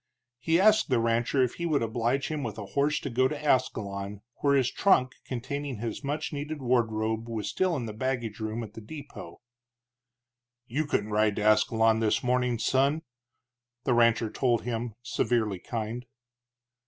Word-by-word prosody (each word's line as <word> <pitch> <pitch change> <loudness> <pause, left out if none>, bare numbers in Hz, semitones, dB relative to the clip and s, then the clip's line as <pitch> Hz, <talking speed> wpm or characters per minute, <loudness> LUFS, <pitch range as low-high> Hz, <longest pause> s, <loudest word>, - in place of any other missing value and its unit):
He 165 +7 +2
asked 215 -1 +5
the 125 -3 +3
rancher 115 +3 +2
if 125 - 0
he 170 - 0
would 150 -6 +1
oblige 120 +4 0
him 155 -2 -2
with 115 -6 -4
a 105 - -5
horse 145 +2 +2
to 140 - -4
go 130 +2 +3
to 150 +1 -4
Ascalon, 100 -8 -1 0.2
where 140 -1 +2
his 130 -3 +2
trunk 130 -10 +3
containing 135 +1 -4
his 115 +5 -5
much 150 +3 -3
needed 145 +1 -4
wardrobe 115 -3 0
was 110 -3 -3
still 185 - +1
in 125 -5 -3
the 110 - -5
baggage 120 -2 -2
room 110 +1 -3
at 105 -2 -9
the 115 - -9
depot. 145 +6 -10 1.2
"You 145 +6 -2
couldn't 105 -6 -1
ride 105 -1 +2
to 105 - -2
Ascalon 110 +1 +4
this 110 -2 +1
morning, 125 -1 +1
son," 140 +7 +1 0.8
the 130 - +2
rancher 115 -2 +3
told 120 -3 +1
him, 115 -2 -3
severely 115 -4 0
kind. 115 +4 -4
120 Hz, 165 wpm, -28 LUFS, 110-140 Hz, 1.2 s, asked